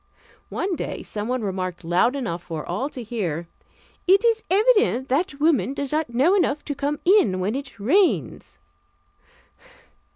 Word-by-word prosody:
One 370 -1 -2
day - - -5
someone 225 +3 -3
remarked 185 -3 -4
loud 175 +10 +2
enough 205 -11 -3
for 165 -3 -6
all 210 +11 -2
to 255 -4 -8
hear: 175 -8 -3 0.6
"It 390 +5 +5
is 455 -1 +3
evident 405 - +3
that 290 +2 0
woman 280 - +2
does 280 -2 -4
not 310 -3 0
know 265 +10 +3
enough 305 -7 +1
to 290 - -2
come 285 +2 -2
in 340 - +4
when 195 +4 -1
it 270 -4 -6
rains." 350 - +1
265 Hz, 150 wpm, -23 LUFS, 200-330 Hz, 0.6 s, It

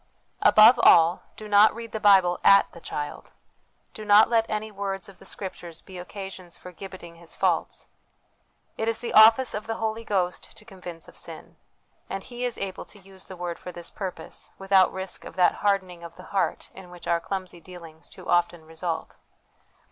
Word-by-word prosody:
Above 220 +3 +7
all, 170 -3 +6
do 215 - -9
not 210 +1 +5
read 230 0 -8
the 220 - -4
Bible 190 -4 +4
at 200 0 +7
the - - -13
child: 145 -2 -6 0.6
do 215 - -8
not 210 +1 +6
let 225 -1 +2
any 215 0 -3
words 195 -1 -4
of 195 - -16
the - - -15
Scriptures 175 -4 -7
be 185 -2 -11
occasions 185 -1 -9
for 180 - -11
gibbeting 175 -2 -11
his 170 -1 -9
faults. - - -1 0.9
It 220 - -1
is 230 - +1
the 235 - -5
office 225 +4 +7
of 210 0 -5
the 225 - -2
Holy 220 0 -3
Ghost 185 -4 -2
to 215 - -15
convince 180 -6 -9
of - - -13
sin; - - -9 0.5
and 195 0 -5
He 245 0 -7
is 245 - -3
able 195 -1 -5
to - - -13
use 190 -1 -14
the 185 - -11
Word 175 -1 -5
for 180 - -8
this 175 -1 -9
purpose, 190 -3 -7
without 195 -1 +3
risk 190 0 -6
of - - -11
that 180 -1 +3
hardening 190 -4 -1
of 170 0 -10
the 185 - -13
heart 195 - -1
in 190 -2 -12
which 175 -1 -12
our 170 - +2
clumsy 185 0 -6
dealings 165 -3 -13
too - - -13
often 175 -2 +1
result. 160 0 -5
190 Hz, 190 wpm, -25 LUFS, 175-210 Hz, 0.9 s, Above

